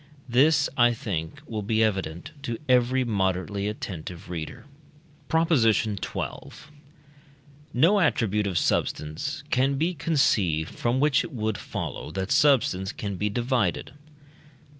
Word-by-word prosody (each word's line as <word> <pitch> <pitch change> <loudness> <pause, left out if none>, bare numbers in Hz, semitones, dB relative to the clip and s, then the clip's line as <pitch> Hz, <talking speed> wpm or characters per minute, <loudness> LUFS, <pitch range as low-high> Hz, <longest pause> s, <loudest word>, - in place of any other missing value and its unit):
This, 140 +5 +4
I 120 -1 +5
think, 100 - -4
will 110 -5 -4
be 110 +2 +1
evident 95 -6 -2
to 120 -5 -3
every 130 +1 +3
moderately 100 -2 -1
attentive 90 -5 -6
reader. 80 +5 -6 0.6
PROP. 165 +1 +2
XII. 110 -4 +2 1.7
No 165 +12 +4
attribute 105 - +1
of 90 -3 -1
substance 75 -1 -1
can 135 +2 +2
be 165 +6 0
conceived 100 - +1
from 120 +2 0
which 145 -1 +3
it 175 - -7
would 110 -4 -2
follow - - -5
that 95 0 -3
substance 110 -10 +3
can 100 -1 -5
be 105 +3 -1
divided. 120 0 -1
110 Hz, 120 wpm, -26 LUFS, 95-130 Hz, 1.7 s, I